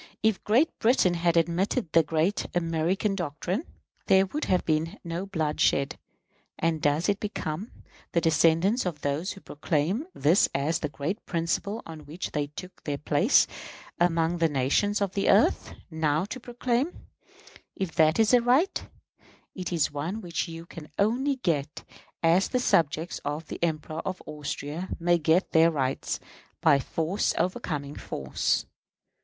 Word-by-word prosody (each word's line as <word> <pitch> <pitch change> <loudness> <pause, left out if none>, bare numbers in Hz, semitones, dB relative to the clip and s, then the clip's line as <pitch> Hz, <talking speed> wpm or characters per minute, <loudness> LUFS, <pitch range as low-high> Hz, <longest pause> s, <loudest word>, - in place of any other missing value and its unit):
If 220 -3 +2
Great 245 +10 +2
Britain 225 -6 +3
had 170 0 +1
admitted 170 - +1
the 165 - +6
great 160 +5 0
American 175 +4 0
doctrine, 180 - -3 0.4
there 190 0 +5
would 295 +11 -3
have 185 -1 +1
been 160 +5 0
no 170 +2 -4
blood 160 -6 -2
shed; 140 0 +2 0.6
and 165 -1 0
does 145 +4 +2
it 200 -1 +1
become 200 -1 -4 0.4
the 170 - +4
descendants 165 +7 +3
of 160 -5 -4
those 145 +6 -1
who 195 - -13
proclaimed 165 - -1
this 160 +7 +4
as 150 +4 +1
the 150 - -2
great 155 +9 -4
principle 180 +6 -2
on 160 -3 -10
which 165 +5 -5
they 145 -1 -1
took 185 +6 -11
their 145 -2 -2
place 150 - +4 0.5
among 170 0 +2
the 165 -1 +3
nations 145 +10 +1
of 195 -2 0
the 200 - +1
earth, - - +3 0.2
now 160 +1 +1
to 235 +5 -6
proclaim, 245 +5 -2 0.7
if 190 -4 -3
that 155 0 +4
is 225 +1 +3
a 245 - +7
right, 260 +11 +2 0.7
it 185 -2 -5
is 165 -4 +1
one 160 +9 -3
which 175 -4 -3
you 165 0 -8
can 160 -3 -11
only 250 +7 +2
get 155 - -2 0.4
as 170 +4 +4
the 250 - 0
subjects 165 - +1
of 150 +3 -3
the - - -6
Emperor 155 -1 -2
of 185 -1 -4
Austria 150 +3 -5
may 175 0 +3
get 160 +4 +2
their 165 +1 +6
rights, 135 -5 -2 0.4
by 145 -3 +5
force 165 +8 -1
overcoming 155 -8 -2
force? 65 -1 -1
170 Hz, 155 wpm, -27 LUFS, 155-195 Hz, 0.7 s, a